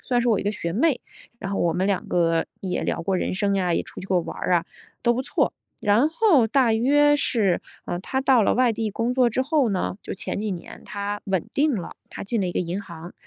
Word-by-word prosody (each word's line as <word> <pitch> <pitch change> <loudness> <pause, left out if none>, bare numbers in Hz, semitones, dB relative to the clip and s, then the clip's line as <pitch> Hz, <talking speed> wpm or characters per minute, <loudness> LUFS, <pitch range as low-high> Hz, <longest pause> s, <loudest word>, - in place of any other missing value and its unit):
算 245 -1 0
是 240 - +1
我 210 - +2
一 - - -4
个 205 - 0
学 170 -5 -4
妹， 270 - +2 0.4
然 195 -2 -5
后 - - -1
我 170 -1 +1
们 185 +2 +1
2 200 -2 -1
个 165 -2 +2
也 185 -2 -2
聊 - - -2
过 190 +2 0
人 185 - -1
生 200 0 +1
呀， 180 -3 +1
也 - - 0
出 - - -10
去 190 - -8
过 185 -2 +2
玩 - - -7
儿 - - -1
啊， 170 -1 +2 0.4
都 240 - +4
不 245 - -1
错。 265 - 0 0.3
然 225 +7 +3
后 325 - +4
大 250 -1 +3
约 290 +6 +4
是 210 -10 +1 0.2
呃， 175 - -3
她 265 +7 -2
到 260 -4 +5
了 - - +2
外 250 -1 +3
地 220 -1 -2
工 230 +4 -1
作 250 -2 +4
之 255 +3 0
后 285 -3 +2
呢， 190 -1 -1
就 - - -5
前 195 - -4
几 215 - -2
年， 180 -3 -7
她 205 0 -4
稳 190 -4 0
定 290 -1 +2
了， 180 -5 -5
她 - - -8
进 220 +1 -1
了 185 - 0
一 175 - -3
个 - - 0
银 180 +3 -3
行。 170 -2 -10
205 Hz, 265 characters per minute, -24 LUFS, 185-250 Hz, 0.4 s, 到